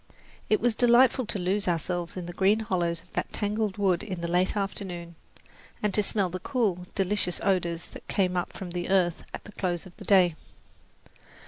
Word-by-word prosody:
It 215 - +4
was 240 0 +2
delightful 245 +1 +4
to - - -1
lose 195 +2 0
ourselves 175 +1 -1
in 180 - -4
the 175 - -7
green 200 +5 +3
hollows 175 -5 -1
of 180 - -28
that - - -2
tangled 210 -1 -1
wood 190 -4 +2
in 190 -5 -5
the 170 - -2
late 180 +4 +1
afternoon, 185 -4 -3 0.7
and 210 -2 +1
to 210 - +4
smell 195 -3 +1
the 185 - -4
cool, 190 -6 -1
delicious 190 -2 +1
odours 175 -3 0
that - - -12
came 185 -2 +1
up 180 0 -1
from 185 -2 -7
the 175 0 -3
earth 180 -3 +2
at - - -7
the 210 - -11
close 180 -4 -2
of 185 - -14
day. 185 -4 +4
185 Hz, 190 wpm, -27 LUFS, 175-205 Hz, 0.7 s, It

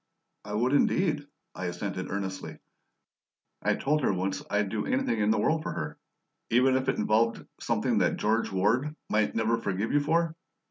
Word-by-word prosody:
"I 105 0 -5
would 125 +5 +1
indeed," 150 -1 +2 0.3
I 95 - -5
assented 95 +1 -4
earnestly. 95 -1 -4 1.0
"I - - +2
told 150 +2 +1
her 130 - +2
once 95 0 -2
I'd 105 -1 +1
do 105 +1 -2
anything 260 - 0
in 105 0 +2
the 110 - +3
world 155 +9 +2
for - - -4
her." - - -5 0.5
"Even 130 +3 +4
if 130 0 +1
it - - 0
involved 110 +2 +1
something - - +1
that - - +2
George 110 +2 +1
Ward 115 +11 +1 0.2
might 105 0 +2
never 115 +1 +1
forgive 100 0 -2
you 145 - +4
for?" 165 +2 +1
110 Hz, 175 wpm, -28 LUFS, 100-140 Hz, 1.0 s, Even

